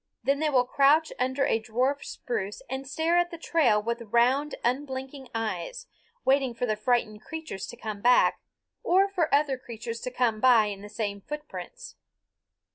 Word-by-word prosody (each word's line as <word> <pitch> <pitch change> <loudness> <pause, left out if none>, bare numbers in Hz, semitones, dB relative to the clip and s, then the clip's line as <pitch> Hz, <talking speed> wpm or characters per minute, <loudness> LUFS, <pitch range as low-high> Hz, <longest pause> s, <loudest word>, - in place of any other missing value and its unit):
Then 280 +1 +1
they 310 0 +1
will 255 -3 +3
crouch 285 +5 +3
under 260 +2 +1
a 225 - +2
dwarf 255 +6 0
spruce 205 -4 -4
and 265 +1 -5
stare 320 +5 +1
at 350 0 +1
the 335 - -8
trail 320 -10 +2
with 235 +3 -3
round 245 +6 +2
unblinking 265 +1 -3
eyes, 225 - -3 0.4
waiting 265 -2 +2
for 245 - -1
the 215 -3 0
frightened 215 -1 0
creatures 315 - -6
to 240 - -9
come 215 -3 -6
back, 245 +2 +4 0.4
or 380 +3 +4
for 360 -5 -1
other 280 -2 +2
creatures 230 -1 -6
to - - -3
come 245 -3 0
by 240 -3 +6
in 200 -1 -5
the 205 - -9
same 205 -2 -3
footprints. 300 - -8
255 Hz, 170 wpm, -27 LUFS, 225-295 Hz, 0.4 s, by